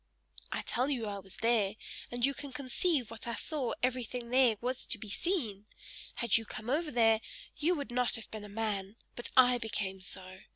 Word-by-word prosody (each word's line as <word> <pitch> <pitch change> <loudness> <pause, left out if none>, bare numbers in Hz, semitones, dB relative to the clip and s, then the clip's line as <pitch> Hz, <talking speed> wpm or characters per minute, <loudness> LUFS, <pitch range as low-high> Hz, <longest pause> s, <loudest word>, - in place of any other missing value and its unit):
"I - - -2
tell 255 +3 +1
you 250 -6 0
I 200 -1 -3
was 190 -1 -8
there, 220 -3 +2 0.3
and 245 0 +1
you 275 - +2
can 280 0 -7
conceive 260 +1 0
that 225 +1 -8
I 235 - -1
saw 285 -5 -1
everything 250 -1 -1
there 250 -4 +5
was 255 +1 -3
to 230 - +3
be 205 -1 -8
seen. 220 - -1 0.5
Had 235 -2 +4
you 225 - -1
come 220 +3 -4
over 310 +3 +1
there, 225 -4 +4 0.4
you 340 +4 +3
would 285 -5 -4
not 250 0 +2
have 230 - -6
been 215 -1 -6
a 210 - -8
man; 205 -2 -2 0.2
but 240 - -3
I 250 -1 +7
became 205 -4 -3
so! 185 0 -8
235 Hz, 200 wpm, -33 LUFS, 215-255 Hz, 0.5 s, I